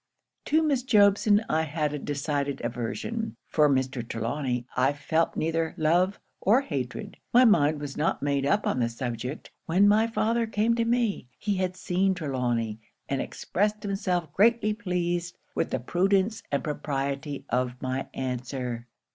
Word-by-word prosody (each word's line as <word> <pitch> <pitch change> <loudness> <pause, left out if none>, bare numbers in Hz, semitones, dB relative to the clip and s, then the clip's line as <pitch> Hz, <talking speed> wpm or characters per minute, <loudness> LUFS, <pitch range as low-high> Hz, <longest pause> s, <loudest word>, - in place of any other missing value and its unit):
To 315 +1 +3
Miss 285 -5 +2
Jobson, 205 -2 +4
I 160 - +2
had 155 -1 -1
a 150 - -3
decided 145 0 -2
aversion; 125 - -3
for 150 -2 +3
Mr. 130 -2 0
Trelawny, 120 +2 -2
I 130 +3 +3
felt 160 +3 0
neither 165 +1 0
love 175 +5 +2 0.2
or 230 +7 +4
hatred. 135 - -5
My 250 +2 +7
mind 155 -9 +4
was 145 -2 -6
not - - 0
made 140 -1 +1
up 200 +9 +2
on - - 0
the 120 -1 +1
subject, 125 +3 -5 0.2
when 185 +5 +4
my 215 +2 +4
father 230 0 +1
came 220 +1 +1
to 230 0 +1
me: 230 - 0
he 205 -2 -1
had 185 0 -1
seen 190 +1 +1
Trelawny, 120 -8 -1 0.3
and 135 - -1
expressed 210 +2 -1
himself 185 -6 -1
greatly 220 +1 +3
pleased 175 -4 -2 0.2
with - - -1
the 130 - -1
prudence 195 - +1
and 140 - 0
propriety 140 -1 -3
of 125 0 -1
my 130 +1 -3
answer. 125 -2 -4
160 Hz, 155 wpm, -27 LUFS, 135-205 Hz, 0.3 s, My